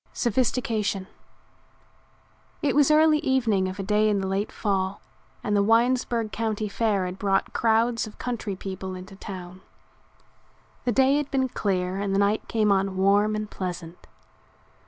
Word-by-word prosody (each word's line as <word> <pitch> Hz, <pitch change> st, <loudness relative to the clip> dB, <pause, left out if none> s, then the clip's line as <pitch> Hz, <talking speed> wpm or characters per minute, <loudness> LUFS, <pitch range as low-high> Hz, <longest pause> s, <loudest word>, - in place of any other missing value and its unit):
SOPHISTICATION 225 Hz, -5 st, 0 dB, 1.6 s
It 285 Hz, -2 st, +1 dB
was 290 Hz, -1 st, +5 dB
early 310 Hz, 0 st, +5 dB
evening 235 Hz, -, +1 dB
of 185 Hz, +1 st, -5 dB
a 195 Hz, -, -3 dB
day 210 Hz, +2 st, +2 dB
in 205 Hz, -1 st, +1 dB
the 195 Hz, -, -2 dB
late 195 Hz, +2 st, -1 dB
fall 195 Hz, -1 st, -1 dB, 0.4 s
and 210 Hz, -, 0 dB
the 200 Hz, -, +4 dB
Winesburg 230 Hz, 0 st, +2 dB
County 215 Hz, -1 st, -2 dB
Fair 205 Hz, -2 st, 0 dB
had 180 Hz, +1 st, -6 dB
brought 195 Hz, -2 st, 0 dB
crowds 230 Hz, 0 st, +2 dB
of 210 Hz, -, -12 dB
country 230 Hz, -5 st, -4 dB
people 190 Hz, 0 st, -6 dB
into 185 Hz, +2 st, -10 dB
town. 185 Hz, -2 st, -9 dB, 1.2 s
The 245 Hz, -, +2 dB
day 265 Hz, +4 st, +4 dB
had 295 Hz, -1 st, -2 dB
been 265 Hz, -1 st, 0 dB
clear 185 Hz, -4 st, -1 dB
and 200 Hz, -1 st, -1 dB
the -, -, +3 dB
night 205 Hz, +2 st, +1 dB
came 215 Hz, -2 st, +2 dB
on 195 Hz, -1 st, +1 dB
warm 205 Hz, +2 st, +3 dB
and 215 Hz, 0 st, -3 dB
pleasant. 180 Hz, -3 st, -6 dB
210 Hz, 155 wpm, -25 LUFS, 195-230 Hz, 1.6 s, was